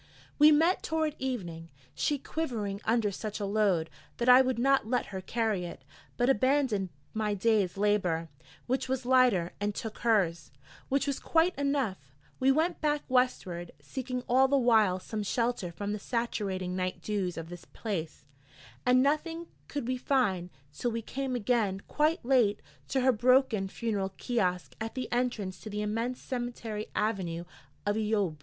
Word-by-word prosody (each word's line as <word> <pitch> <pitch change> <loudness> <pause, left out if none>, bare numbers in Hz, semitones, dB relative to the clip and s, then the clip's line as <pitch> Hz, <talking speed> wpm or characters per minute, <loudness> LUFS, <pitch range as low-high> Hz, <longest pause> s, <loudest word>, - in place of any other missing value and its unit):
We 300 +1 +9
met 325 +5 +4
toward 315 -2 -1
evening, 175 -11 -4 0.2
she 295 - 0
quivering 225 -10 -3
under 225 -2 +2
such 210 +2 -5
a 205 - -2
load, 195 -5 +2 0.3
that 240 - -1
I 250 +1 +9
would 260 -1 0
not 270 -1 +3
let 250 +2 +1
her 190 - -3
carry 220 -2 -1
it, 170 -6 -8 0.3
but 245 - +2
abandoned 260 -5 +2 0.2
my 215 -1 0
day's 200 -2 +2
labour, 190 -5 +1 0.4
which 260 +1 -1
was 260 -1 -1
lighter, 245 -9 +4
and 205 0 -1
took 220 -2 -5
hers, 190 -8 +1 0.4
which 275 +1 +2
was 280 -2 -1
quite 335 +3 +2
enough: 280 -8 0 0.4
we 265 +1 +4
went 325 +5 +1
back 295 -1 +1
Westward, 190 -9 0
seeking 255 -2 -5
all 260 +2 +5
the 280 +1 +3
while 220 -7 +4
some 215 +3 -4
shelter 230 -3 -1
from 205 +5 -4
the 210 - -3
saturating 195 -6 -2
night 185 0 -3
dews 195 -4 -2
of 165 0 -6
this 175 -1 -9
place: 170 - -5 0.6
and 250 +1 +6
nothing 325 +4 -1 0.2
could 285 -5 -4
we 255 0 0
find, 210 -10 +1 0.2
till 240 - -1
we 230 0 -3
came 265 +2 -3
again, 220 -4 +1
quite 305 -2 +1
late, 240 -6 +3 0.2
to 265 - 0
her 260 +1 +5
broken 245 -3 +3
funeral 200 -2 -2
kiosk 180 - -1
at 225 +2 -4
the 255 -2 -4
entrance 235 -7 -1
to 215 - -8
the 210 0 -3
immense 230 +4 -2
cemetery 240 -4 -4
avenue 190 -6 -1 0.4
of 205 0 +1
Eyoub. 210 -7 0
225 Hz, 165 wpm, -30 LUFS, 195-260 Hz, 0.6 s, We